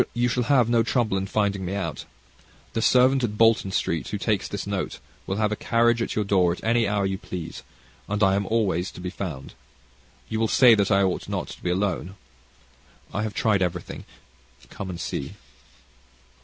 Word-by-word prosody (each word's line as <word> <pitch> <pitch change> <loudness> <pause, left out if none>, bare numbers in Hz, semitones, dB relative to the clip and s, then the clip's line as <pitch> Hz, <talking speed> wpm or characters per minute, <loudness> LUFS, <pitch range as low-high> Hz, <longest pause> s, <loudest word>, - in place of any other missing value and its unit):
You 120 +1 +2
shall 125 0 0
have 130 -5 +5
no 120 -1 +3
trouble 115 -3 0
in 95 0 -1
finding 100 -2 0
me 95 +2 -3
out. 100 - -4 0.7
The 115 - -1
servant 130 +3 +4
at 105 -3 -2
Blank 115 -4 +4
Street, 80 -6 -1
who - - -3
takes - - 0
this - - -5
note, - - -3 0.3
will 95 - -1
have 105 0 0
a - - 0
carriage 115 +2 +2
at - - -2
your 105 - 0
door 95 -3 +3
at 85 - -6
any 115 0 +2
hour 100 -1 0
you 95 0 -2
please; 85 -2 -7 0.5
and 105 +1 0
I 95 0 +4
am 100 0 0
always 100 -5 0
to - - -10
be 90 0 -5
found. 85 -9 -6 0.7
You 110 - -3
will 110 - +2
say 125 +1 +6
that 100 -2 +2
I 100 0 +4
ought 95 -2 -1
not - - -3
to - - -10
be 90 - -2
alone. 95 0 -1 1.0
I 100 - -1
have 110 -1 -3
tried 105 -3 +2
everything. 90 -1 -3 0.7
Come 95 - -6
and 85 -2 -6
see." - - -4
100 Hz, 195 wpm, -25 LUFS, 95-115 Hz, 1.0 s, say